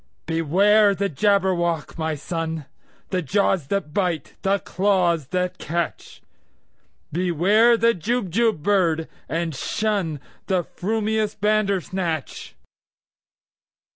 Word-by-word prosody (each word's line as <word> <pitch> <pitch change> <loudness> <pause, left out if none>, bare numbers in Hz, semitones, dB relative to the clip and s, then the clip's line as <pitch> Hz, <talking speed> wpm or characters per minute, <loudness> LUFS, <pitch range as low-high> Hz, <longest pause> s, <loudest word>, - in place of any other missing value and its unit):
"Beware 195 +6 +3
the 200 +1 -1
Jabberwock, 175 -2 +1
my 160 -1 -2
son! 160 0 -4 0.5
The 185 -1 0
jaws 180 -1 +1
that 175 -6 -2
bite, 175 -6 -1
the 195 0 +2
claws 180 -7 +1
that 180 +2 -2
catch! 170 +1 -4 0.9
Beware 185 +8 +3
the 230 +1 +3
Jubjub 220 -2 0
bird, 170 -5 +2 0.2
and 165 0 -2
shunThe 185 0 -2
frumious 215 +1 -2
Bandersnatch!" 190 -6 -1
185 Hz, 90 wpm, -23 LUFS, 165-205 Hz, 0.9 s, Beware